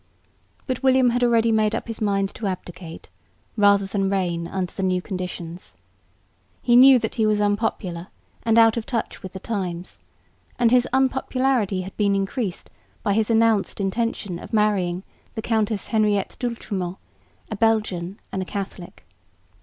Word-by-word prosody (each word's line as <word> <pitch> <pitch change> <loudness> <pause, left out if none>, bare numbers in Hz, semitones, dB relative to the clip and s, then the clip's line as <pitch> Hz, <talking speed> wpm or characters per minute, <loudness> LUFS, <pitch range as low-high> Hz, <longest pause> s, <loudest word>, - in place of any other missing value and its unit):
But 255 -2 -3
William 260 -2 +4
had 245 +1 0
already 230 -1 +3
made 215 0 +2
up 230 - -4
his 225 -1 -6
mind 195 -2 +1
to 215 - -4
abdicate, 180 -2 -7 0.5
rather 200 -2 +4
than 195 0 -1
reign 175 -4 -1
under 185 -1 -3
the - - -6
new 185 -1 +1
conditions. 180 -2 -7 0.9
He 240 - +4
knew 260 +1 +9
that 225 -2 -3
he 220 -2 +1
was 210 -1 +2
unpopular 205 -4 -1 0.3
and 225 -1 +2
out 225 0 +6
of 225 - -4
touch 235 -3 -3
with 190 -2 -8
the 190 - -6
times; 185 -5 -4 0.6
and 235 -2 +3
his 250 0 +4
unpopularity 260 -5 +1
had 190 +1 -8
been 200 -2 +2
increased 195 0 -3 0.3
by 200 - +1
his 220 +1 +1
announced 225 -3 +2
intention 200 -2 -2
of - - -11
marrying 195 -4 +1 0.3
the 220 - -3
Countess 220 -3 -1
Henriette 210 -3 +1
D'Oultremont, 200 -7 -3 0.5
a - - -2
Belgian 205 -4 0
and 190 - -2
a - - -3
Catholic. 190 - -7
205 Hz, 155 wpm, -23 LUFS, 190-230 Hz, 0.9 s, knew